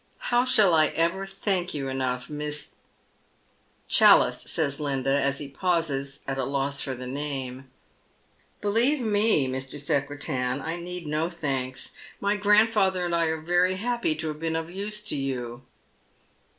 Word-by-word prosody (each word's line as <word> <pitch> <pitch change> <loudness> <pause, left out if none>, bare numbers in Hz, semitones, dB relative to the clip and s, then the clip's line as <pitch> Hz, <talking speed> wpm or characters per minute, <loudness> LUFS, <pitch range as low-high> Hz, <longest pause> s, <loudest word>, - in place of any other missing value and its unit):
How 245 +1 +1
shall 210 -8 +5
I 155 -1 +5
ever 170 +5 -1
thank 195 -3 -1
you 135 -2 -3
enough, 130 -1 -2
Miss 150 -1 -3 0.4
" - - -38
" - - -38
Challice," - - +6
says 140 -2 0
Linda, 135 -2 -1
as 140 0 +1
he 145 - -5
pauses 140 -3 -1
at 135 0 -2
a - - 0
loss 140 +1 -1
for 130 - -3
the 125 +1 -8
name. 135 -1 -5 0.5
" - - -37
Believe 235 +8 +2
me, 210 - +2
Mr. 130 +2 -5
Secretan, 140 -3 -1
I 160 +4 -4
need 175 0 -6
no 155 +2 -1
thanks. 135 -6 -3 0.3
My 200 +1 +1
grandfatlior 205 -2 +3
and 175 - -2
1 170 -1 +2
are 160 0 -2
very 175 +3 +2
happy 235 -4 -1
to 160 0 -4
have 150 0 -6
been 160 0 -2
of 165 +1 -3
use 210 +3 -4
to 210 - -2
you." 125 -3 -3
155 Hz, 165 wpm, -26 LUFS, 135-185 Hz, 0.5 s, Challice